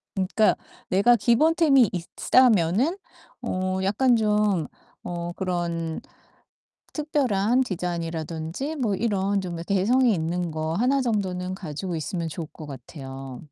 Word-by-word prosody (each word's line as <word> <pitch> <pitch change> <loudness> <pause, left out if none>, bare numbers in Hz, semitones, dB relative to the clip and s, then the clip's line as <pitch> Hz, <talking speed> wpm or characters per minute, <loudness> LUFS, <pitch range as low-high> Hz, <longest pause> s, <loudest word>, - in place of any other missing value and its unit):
그러니까 195 +3 +2 0.3
내가 200 +6 +5
기본템이 275 - +4
있다면은 220 - +2 0.4
어 185 0 -2
약간 240 +6 +3
좀 210 -6 +1 0.4
어 175 0 -4
그런 170 -3 -2 0.9
특별한 260 -6 +1
디자인이라든지 170 - -4
뭐 225 -7 0
이런 200 -2 0
좀 175 -2 -5
개성이 225 +5 +3
있는 170 +1 -2
거 155 +1 -2
1 255 +7 +2
정도는 185 -6 -1
가지고 175 0 -5
있으면 165 +1 -3
좋을 160 0 -5
것 155 - -10
같아요. 135 -1 -8
190 Hz, 250 characters per minute, -25 LUFS, 170-235 Hz, 0.9 s, 내가